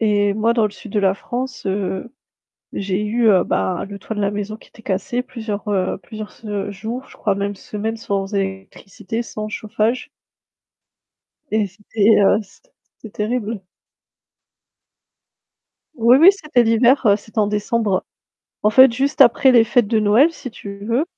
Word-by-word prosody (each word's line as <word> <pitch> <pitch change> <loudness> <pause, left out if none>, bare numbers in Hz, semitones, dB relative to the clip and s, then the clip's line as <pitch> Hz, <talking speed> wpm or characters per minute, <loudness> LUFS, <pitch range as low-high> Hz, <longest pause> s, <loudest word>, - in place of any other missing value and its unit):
et 205 -2 +2
moi 220 +2 +2
dans 230 -2 +2
le 210 - 0
sud 210 0 -12
de 210 - +1
la 195 -1 +2
France, 245 +4 -5
heu, 190 +2 -3 0.6
j'ai 195 +1 -2
eu, 225 +2 +1
heu, 185 -4 +4
bah, 95 - -1
le 200 - -7
toit 220 +3 -6
de 210 - -2
la 200 - +1
maison 205 +1 -4
qui - - -19
était 225 - -18
cassé 235 +6 -2
plusieurs, 220 -4 -6
heu, 190 -3 0
plusieurs 215 +3 -9
se 205 -2 -5
jours, 225 +6 -6
je - - -16
crois 205 - 0
même 200 +1 -3
semaines 215 +3 -5
sans 200 -2 -3
électricité, 195 +2 -5
sans 215 -2 -6
chauffage 220 +5 -2 1.4
et 215 -1 +1
c'était, 210 +2 +1
heu, 200 +2 +4
c'ét - - -23 0.3
c'était 220 - -11
terrible. 215 -1 -2 2.3
Oui 235 +2 +5
oui 335 +6 +9
c'était 305 -10 +1
l'hiver, 235 +4 +3
heu, 200 - +5
c'était 220 +2 -10
en 210 - +3
décembre. 210 -1 -1 0.6
En 210 - +3
fait 260 +2 +7
juste 275 +5 -1
après 265 +1 +6
les 235 -2 +6
fêtes 235 0 +2
de 220 +1 +1
Noël 225 +10 +4
si 255 - -8
tu 200 -2 -9
veux, 235 +7 +1
215 Hz, 165 wpm, -20 LUFS, 200-235 Hz, 2.3 s, oui